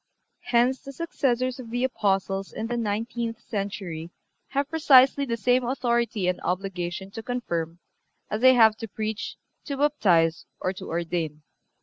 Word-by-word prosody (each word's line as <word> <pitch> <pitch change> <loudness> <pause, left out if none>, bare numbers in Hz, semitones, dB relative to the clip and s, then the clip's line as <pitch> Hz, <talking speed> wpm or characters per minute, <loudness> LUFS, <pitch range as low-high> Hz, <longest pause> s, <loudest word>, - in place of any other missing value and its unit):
Hence 245 +2 +2
the 275 - -9
successors 255 -5 -1
of 240 -3 -8
the 245 +2 -1
Apostles 195 -5 0
in 220 - -4
the 240 +1 -2
nineteenth 230 +1 -2
century 195 -6 -4 0.4
have 280 0 -1
precisely 280 -3 +5
the 230 -3 -2
same 250 +3 +2
authority 235 -5 0
and 180 - 0
obligation 185 0 -3
to 225 - -6
confirm 170 -10 -3 0.5
as 215 +1 -3
they 260 0 +7
have 220 -3 +6
to 225 - -6
preach, 215 +2 -4 0.3
to 280 - -4
baptize 180 - +2
or 185 - -1
to - - -9
ordain. 165 -3 -2
225 Hz, 145 wpm, -26 LUFS, 190-255 Hz, 0.5 s, they